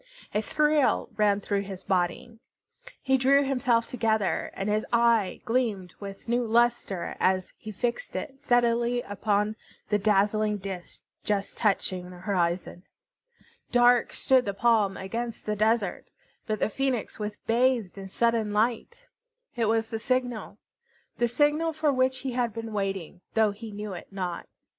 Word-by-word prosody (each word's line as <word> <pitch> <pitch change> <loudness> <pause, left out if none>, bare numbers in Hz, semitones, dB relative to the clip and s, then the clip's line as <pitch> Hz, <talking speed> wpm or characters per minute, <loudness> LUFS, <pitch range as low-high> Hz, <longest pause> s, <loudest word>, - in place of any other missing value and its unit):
A 210 - +1
thrill 300 +4 +2
ran 205 -1 +2
through 200 0 -1
his 190 -1 -8
body. 190 +5 -1 0.6
He 265 0 +3
drew 275 +2 +5
himself 250 -4 +1
together, 220 -4 0
and 195 - -3
his 210 +1 +1
eye 235 -4 +3
gleamed 220 -7 -1
with 195 +1 -9
new 240 +1 +1
lustre 230 -6 +1
as 185 0 +1
he 215 - -8
fixed 240 - -3
it 270 -1 -5
steadily 240 -2 +2
upon 205 +1 0 0.3
the 210 - +2
dazzling 210 +1 +2
disk 190 -2 -7 0.2
just 205 -1 -1
touching 185 -4 0
the 180 - -11
horizon. 175 -2 -1 0.9
Dark 245 0 +4
stood 260 -1 +3
the 200 -1 -3
palm 210 -2 +2
against 230 +4 -5
the 210 - -1
desert, 215 -2 +1 0.4
but 215 -1 0
the - - 0
Phoenix 265 -2 -2
was 210 0 -3
bathed 235 -4 +2
in 195 -1 -8
sudden 230 +1 +1
light. 235 - 0 0.5
It 235 -2 +1
was 225 +1 +1
the 225 - -2
signal, 245 -1 -2 0.6
the 240 - +3
signal 295 +6 +2
for 305 -2 +1
which 260 0 +1
he 265 - -3
had 240 -3 -1
been 225 -1 -5
waiting, 195 -3 -3
though 220 -2 +4
he 220 +2 -9
knew 210 -1 -5
it 175 - -8
not. 185 -3 -4
220 Hz, 150 wpm, -27 LUFS, 200-245 Hz, 0.9 s, drew